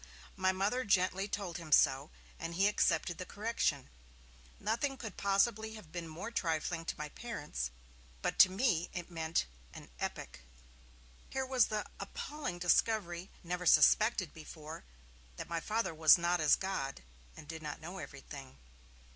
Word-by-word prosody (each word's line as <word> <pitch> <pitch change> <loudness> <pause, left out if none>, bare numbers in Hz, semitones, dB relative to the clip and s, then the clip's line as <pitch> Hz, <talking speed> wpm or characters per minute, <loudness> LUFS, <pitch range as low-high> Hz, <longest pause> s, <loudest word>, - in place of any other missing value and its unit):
My 185 -1 +2
Mother 205 +7 0
gently 195 -1 +2
told 195 -5 -3
him 160 -2 -9
so, 140 0 +5 0.3
and 165 +1 -4
he 195 +3 +4
accepted 175 -4 +1
the - - -2
correction. 205 - -1 0.7
Nothing 235 +6 -1
could 220 -6 -7
possibly 220 +2 +1
have 180 -8 -12
been 170 -1 -5
more 170 +8 -6
trifling 165 -4 -1
to - - -3
my 150 -1 -5
parents, 150 - -4 0.5
but - - -1
to 190 - +10
me 185 -4 +1
it 175 0 -6
meant 165 -1 0 0.3
an - - -10
epoch. - - -4 0.9
Here 265 0 -1
was 255 -2 +4
the 215 -1 -2
appalling 305 - -5
discovery, 175 0 +1
never 180 0 -2
suspected 185 +4 +5
before, 155 0 -9 0.5
that - - -6
my 170 0 -1
Father 220 +1 -1
was 160 +2 +7
not 175 0 +1
as 150 -2 +6
God, 140 - -3 0.3
and 150 - -11
did 160 +1 -6
not 150 -2 -5
know 175 +4 -7
everything. 140 -3 -9
180 Hz, 150 wpm, -34 LUFS, 160-210 Hz, 0.9 s, to